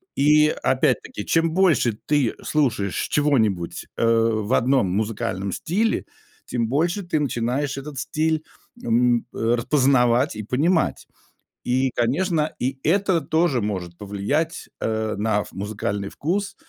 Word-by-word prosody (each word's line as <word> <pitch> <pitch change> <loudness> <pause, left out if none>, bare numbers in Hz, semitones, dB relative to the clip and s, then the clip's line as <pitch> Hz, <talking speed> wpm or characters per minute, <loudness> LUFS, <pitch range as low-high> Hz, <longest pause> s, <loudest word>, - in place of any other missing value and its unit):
И 150 +2 +5 0.2
опять-таки, 125 -5 0
чем 165 0 +2
больше 160 - +2
ты 145 -6 +2
слушаешь 115 - 0
чего-нибудь, 110 - +1
э, 115 - +1
в 115 -1 +2
одном 130 -5 +3
музыкальном 105 -1 -2
стиле, 215 +7 0 0.4
тем 115 -2 -1
больше 170 - 0
ты 165 -3 -1
начинаешь 135 +1 -1
этот 140 -1 -6
стиль, 155 +2 -1 0.4
м, 120 +1 +2
э, 115 +1 +1
распознавать 125 -1 +2
и 110 - -4
понимать. 155 - +1 0.6
И, 130 +1 +1
конечно, 155 +6 0
и 130 +1 -2
это 185 0 +2
тоже 160 -4 +1
может 90 -5 -4
повлиять, 105 +12 -2
э, 110 -1 -1
на 105 -1 +1
в - - -14
музыкальный 100 0 -3
вкус 195 +6 -2
130 Hz, 125 wpm, -23 LUFS, 110-155 Hz, 0.6 s, И